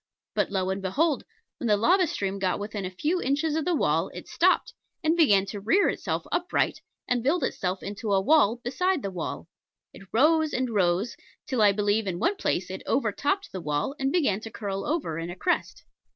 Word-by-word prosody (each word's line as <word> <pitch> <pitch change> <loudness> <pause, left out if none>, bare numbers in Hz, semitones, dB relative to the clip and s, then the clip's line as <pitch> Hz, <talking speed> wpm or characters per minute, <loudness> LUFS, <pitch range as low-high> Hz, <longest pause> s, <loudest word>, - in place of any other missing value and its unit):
But - - +1
lo 190 -1 -1
and 195 +1 -3
behold! 280 - 0 0.3
when 240 - -2
the 210 -2 +4
lava 360 - +4
stream 195 -7 -3
got 185 -2 0
within 205 -1 -5
a - - -2
few 305 - -1
inches 295 +3 0
of 315 -1 -1
the 355 - +2
wall - - +1
it - - -8
stopped, - - +2 0.3
and 315 +1 +3
began 205 - +4
to 200 +1 -6
rear 235 - +3
itself - - -2
upright 350 +1 0 0.3
and 245 -1 +1
build 290 +9 +1
itself 185 0 -2
into 205 +1 -4
a 195 - +4
wall 235 0 +4
beside 360 +6 0
the 195 - -3
wall. 180 -3 -5 0.5
It 195 - -13
rose 310 +5 +3
and 255 -1 -1
rose, 190 +2 +1 0.3
till 255 -5 -1
I 205 -1 +7
believe 205 +1 +1
in 180 -2 -2
one 365 - +1
place - - -1
it - - -6
overtopped 390 0 0
the 185 - -5
wall 150 - -1
and 270 0 0
began 275 - +2
to 225 - -8
curl 200 -3 -4
over 285 - -1
in 165 +1 -4
a 175 - -6
crest. 355 - -1
220 Hz, 205 wpm, -26 LUFS, 195-310 Hz, 0.5 s, I